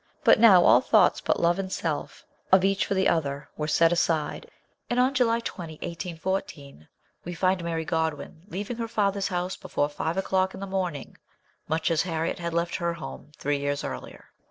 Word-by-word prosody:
But -, -, +6 dB
now 200 Hz, -6 st, +8 dB
all -, -, +7 dB
thoughts -, -, +3 dB
but -, -, 0 dB
love 170 Hz, +2 st, +2 dB
and 190 Hz, -1 st, -4 dB
self, 160 Hz, -5 st, -4 dB, 0.3 s
or 190 Hz, 0 st, +6 dB
each 195 Hz, +1 st, +1 dB
for 200 Hz, -, -1 dB
the 190 Hz, 0 st, +2 dB
other, 140 Hz, -3 st, -1 dB
were 150 Hz, -, -3 dB
set 165 Hz, +2 st, +4 dB
aside, 170 Hz, -, 0 dB, 0.4 s
and 245 Hz, -, +1 dB
on 255 Hz, +2 st, +3 dB
July 235 Hz, -3 st, +2 dB
20, 175 Hz, -8 st, -6 dB
1814, 165 Hz, -, -5 dB, 0.4 s
we 175 Hz, 0 st, -6 dB
find 185 Hz, 0 st, +1 dB
Mary 165 Hz, -1 st, -2 dB
Godwin 160 Hz, -1 st, -2 dB
leaving 210 Hz, +4 st, -5 dB
her 230 Hz, -1 st, -3 dB
father's 200 Hz, -3 st, 0 dB
house 180 Hz, 0 st, -2 dB
before 150 Hz, -5 st, -2 dB
five 160 Hz, +4 st, -3 dB
o'clock 190 Hz, 0 st, 0 dB
in -, -, -9 dB
the 195 Hz, -, -4 dB
morning, 185 Hz, -8 st, -4 dB, 0.5 s
much 160 Hz, +1 st, 0 dB
as 165 Hz, -1 st, +2 dB
Harriet 165 Hz, -2 st, -2 dB
had 170 Hz, -1 st, -3 dB
left 170 Hz, +1 st, -1 dB
her 170 Hz, -1 st, -1 dB
home 160 Hz, -2 st, -9 dB
three 145 Hz, 0 st, -1 dB
years 145 Hz, 0 st, -2 dB
earlier. -, -, -8 dB
175 Hz, 185 wpm, -26 LUFS, 160-190 Hz, 0.5 s, now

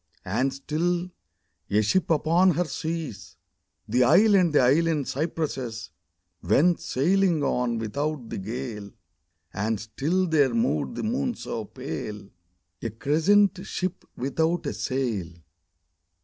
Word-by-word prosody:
And 120 Hz, +9 st, 0 dB
still, 170 Hz, +6 st, -2 dB, 0.6 s
a 105 Hz, +1 st, +3 dB
ship 185 Hz, -, +1 dB
upon 170 Hz, +3 st, +3 dB
her 180 Hz, -, +1 dB
seas, 155 Hz, -, -5 dB, 0.5 s
The 125 Hz, +4 st, +3 dB
isle 195 Hz, -, +6 dB
and 180 Hz, -4 st, +4 dB
the 150 Hz, -, +4 dB
island 150 Hz, +2 st, +2 dB
cypresses 135 Hz, -7 st, -3 dB, 0.5 s
Went 155 Hz, -, +3 dB
sailing 175 Hz, +2 st, +1 dB
on 125 Hz, -3 st, 0 dB
without 135 Hz, +4 st, -3 dB
the -, -, -3 dB
gale: 110 Hz, 0 st, -5 dB, 0.6 s
And 110 Hz, +1 st, -1 dB
still 150 Hz, -, -1 dB
there 155 Hz, -, +2 dB
moved 235 Hz, 0 st, 0 dB
the -, -, -4 dB
moon 240 Hz, +2 st, -1 dB
so 110 Hz, -2 st, -5 dB
pale, 105 Hz, -1 st, -7 dB, 0.5 s
A 115 Hz, -, -2 dB
crescent 180 Hz, -, +3 dB
ship 185 Hz, -1 st, -4 dB
without 160 Hz, +7 st, 0 dB
a -, -, -2 dB
sail 115 Hz, -5 st, -2 dB
145 Hz, 120 wpm, -26 LUFS, 115-175 Hz, 0.6 s, isle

